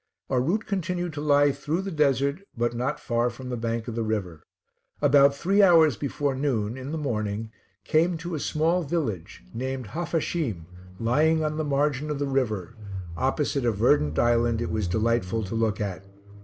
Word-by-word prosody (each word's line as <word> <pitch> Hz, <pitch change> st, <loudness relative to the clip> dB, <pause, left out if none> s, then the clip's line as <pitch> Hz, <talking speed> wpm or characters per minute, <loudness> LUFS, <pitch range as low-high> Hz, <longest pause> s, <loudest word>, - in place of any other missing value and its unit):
Our 125 Hz, -2 st, +3 dB
route 190 Hz, -, 0 dB
continued 175 Hz, -3 st, -2 dB
to 145 Hz, -, -5 dB
lie 145 Hz, -1 st, +4 dB
through 160 Hz, +6 st, -2 dB
the 195 Hz, -, -4 dB
desert, 140 Hz, 0 st, +1 dB, 0.2 s
but 120 Hz, 0 st, 0 dB
not 125 Hz, +5 st, -2 dB
far 120 Hz, -1 st, 0 dB
from 125 Hz, +2 st, -9 dB
the 125 Hz, -, -2 dB
bank 115 Hz, 0 st, -3 dB
of 120 Hz, -, -4 dB
the 115 Hz, -, -2 dB
river; 100 Hz, -8 st, -3 dB, 0.6 s
about 140 Hz, -1 st, +5 dB
three 195 Hz, +8 st, +2 dB
hours 165 Hz, -, +6 dB
before 140 Hz, 0 st, -2 dB
noon 125 Hz, -5 st, -1 dB
in 130 Hz, +2 st, -6 dB
the 160 Hz, -, -2 dB
morning 110 Hz, -6 st, -2 dB, 0.3 s
came 165 Hz, -, +2 dB
to 175 Hz, +2 st, -6 dB
a 155 Hz, -, -2 dB
small 165 Hz, +5 st, +1 dB
village, 140 Hz, -, -3 dB
named 130 Hz, -1 st, -4 dB
Haphasheem, 160 Hz, -, -2 dB, 0.3 s
lying 155 Hz, +7 st, +2 dB
on 155 Hz, 0 st, -1 dB
the 155 Hz, -, 0 dB
margin 145 Hz, 0 st, 0 dB
of 150 Hz, -, -2 dB
the 145 Hz, -, -1 dB
river, 120 Hz, -7 st, -1 dB, 0.4 s
opposite 140 Hz, -, 0 dB
a 120 Hz, -, +3 dB
verdant 100 Hz, -, +2 dB
island 120 Hz, -1 st, +2 dB
it 120 Hz, -, -2 dB
was 105 Hz, -4 st, -1 dB
delightful 110 Hz, +1 st, 0 dB
to 95 Hz, -, -5 dB
look 115 Hz, -1 st, 0 dB
at. 100 Hz, -3 st, -3 dB
135 Hz, 180 wpm, -26 LUFS, 115-155 Hz, 0.6 s, hours